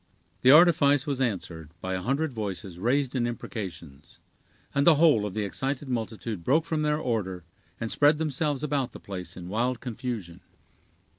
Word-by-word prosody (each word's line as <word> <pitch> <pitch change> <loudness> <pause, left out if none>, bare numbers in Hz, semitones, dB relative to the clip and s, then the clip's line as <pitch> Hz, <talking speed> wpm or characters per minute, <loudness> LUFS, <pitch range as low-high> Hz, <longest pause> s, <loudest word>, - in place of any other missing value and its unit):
The 125 - +5
artifice 145 -3 +6
was 140 -3 -2
answered 90 - -3
by 95 +1 -3
a 95 - -2
hundred 140 +6 -1
voices 100 -4 -5
raised 130 +5 +1
in 120 -2 +1
imprecations; 85 - -7 0.6
and 140 +2 +2
the 165 - +8
whole 145 -9 +4
of 95 - -8
the 110 - 0
excited 135 +7 -3
multitude 110 -5 -4
broke 155 - +2
from 160 -2 -1
their 150 0 +1
order, 105 - -2 0.4
and 110 - -3
spread 145 +1 +4
themselves 150 -2 -1
about 140 -4 -1
the - - -9
place 90 -2 -7
in 90 -1 -8
wild 120 +5 -1
confusion. 115 -8 -5
120 Hz, 165 wpm, -27 LUFS, 95-145 Hz, 0.6 s, the